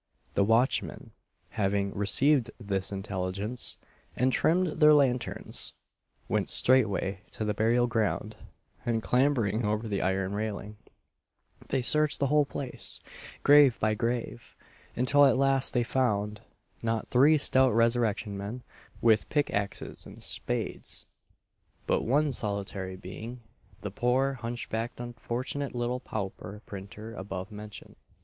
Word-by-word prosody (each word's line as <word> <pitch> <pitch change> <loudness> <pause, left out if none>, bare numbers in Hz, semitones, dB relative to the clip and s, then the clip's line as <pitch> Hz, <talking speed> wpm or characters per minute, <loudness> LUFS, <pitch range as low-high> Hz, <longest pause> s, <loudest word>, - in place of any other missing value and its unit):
The 100 - +3
watchmen, 115 +6 +1 0.4
having 100 -1 0
received 120 +5 +3
this 100 -3 -2
intelligence, 100 +3 -2 0.4
and 130 +1 +2
trimmed 170 -1 +1
their 150 -1 +8
lanterns, 125 -5 0 0.5
went - - 0
straightway 100 -6 +2
to 110 - -3
the 105 - 0
burial 115 +4 +2
ground, 110 -2 -1 0.5
and 115 -2 -1
clambering 125 -5 +2
over 105 +2 -1
the 100 -2 -1
iron 95 +1 0
railing, 105 0 -4 0.9
they 130 - 0
searched 150 +3 +5
the 140 - +2
whole 150 -1 +5
place, 135 -2 -4 0.4
grave 145 -4 +6
by 110 0 +2
grave, 115 - -3 0.4
until 130 +4 +4
at 135 -3 +5
last 135 -1 +3
they 120 - +3
found 105 -4 0 0.4
not 115 -1 -1
three 145 +5 +5
stout 130 -2 +4
resurrection 115 -2 +1
men, 105 +6 -6 0.4
with 110 -2 +4
pick 145 -2 +1
axes 100 -1 -3
and - - -12
spades; - - -2 0.8
but - - +1
one 145 +5 +2
solitary 100 -4 -3
being 110 +7 -8 0.4
the 105 - -5
poor 130 +5 +1
hunchbacked 115 0 -4
unfortunate 120 +3 -4
little 120 +1 -1
pauper 105 -2 -6
printer 100 +3 -9
above 95 0 -6
mentioned. 105 0 -10
115 Hz, 125 wpm, -29 LUFS, 100-130 Hz, 0.9 s, their